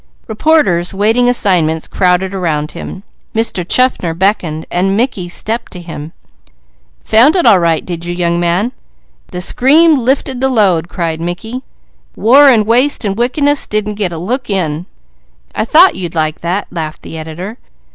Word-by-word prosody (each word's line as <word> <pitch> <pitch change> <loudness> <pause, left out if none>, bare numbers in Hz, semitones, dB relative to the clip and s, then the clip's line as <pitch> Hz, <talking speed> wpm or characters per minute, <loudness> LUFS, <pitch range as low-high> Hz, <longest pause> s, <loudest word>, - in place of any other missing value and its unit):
Reporters 215 - +1
waiting 225 +5 +2
assignments 170 -9 +1
crowded 185 +1 0
around 160 -5 -2
him; 185 +3 -8 0.3
Mr. 220 -5 0
Chaffner 185 -5 +1
beckoned, 175 -4 -1
and 195 +3 0
Mickey 215 -7 -1
stepped 225 +6 -3
to 180 - -7
him. 165 -3 -8 0.9
"Found 245 - +4
it 360 - +2
all 210 -6 +6
right, 165 -2 0
did 170 -2 -6
you, 175 - -3
young 170 -1 0
man?" 175 +7 0 0.6
"The 180 - -6
scream 295 - +4
lifted 260 +1 -1
the 265 - +2
load!" 190 -9 +1
cried 165 -4 -3
Mickey. 220 +9 -5 0.5
"War, 270 +7 +5
and 225 -5 +3
waste, 245 +3 +2
and 195 -1 -1
wickedness, 280 +5 +1
didn't 210 0 -2
get 200 -4 -3
a 165 - -6
look 245 +10 -3
in." 175 -3 -2 0.7
"I - - -1
thought 340 +10 +5
you'd 175 -3 -5
like 155 -1 -1
that!" 180 +4 -2
laughed 155 -3 -6
the - - -9
editor. 175 +8 -7
195 Hz, 155 wpm, -13 LUFS, 170-240 Hz, 0.9 s, all